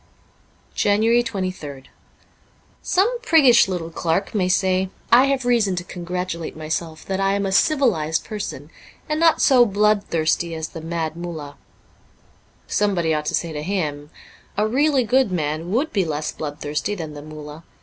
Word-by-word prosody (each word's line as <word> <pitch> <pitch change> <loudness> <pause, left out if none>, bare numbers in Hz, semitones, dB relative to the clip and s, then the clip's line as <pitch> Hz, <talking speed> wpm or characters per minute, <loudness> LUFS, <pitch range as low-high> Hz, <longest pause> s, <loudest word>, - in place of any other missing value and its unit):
'' - - -36
23 - - -1
JANUARY 225 +4 +3
23rd 185 - -5 1.0
SOME 450 +7 +1
priggish 280 - +5
little 175 -3 -4
clerk 165 +4 -1
will 185 -4 +1
say, 185 0 +1
* - - -32
I 250 +3 +7
have 275 -2 0
reason 230 -6 +2
to 175 - -3
congratulate 175 -2 -5
myself 160 +1 -4
that 190 0 -2
I 195 0 +2
am 200 0 -1
a 195 - -1
civilized 190 - +2
person, 210 -2 -6 0.4
and 305 -1 -1
not 330 -1 +4
so 255 -4 +6
bloodthirsty 195 -6 +1
as 160 0 -4
the 165 - -8
Mad 165 -1 -3
Mullah.' 160 -4 -7 1.1
Somebody 180 -6 +1
ought 150 0 -1
to - - +1
say 165 -2 -2
to 150 - -4
him, 150 -5 -3 0.2
* - - -28
A 210 +1 +2
really 275 +3 +2
good 245 -1 +2
man 155 0 -2
would 260 +11 0
be 195 - +2
less 155 -2 -3
bloodthirsty 150 +6 -4
than 160 -5 -6
the 145 - -8
Mullah. 150 +1 -10
185 Hz, 165 wpm, -22 LUFS, 160-220 Hz, 1.1 s, I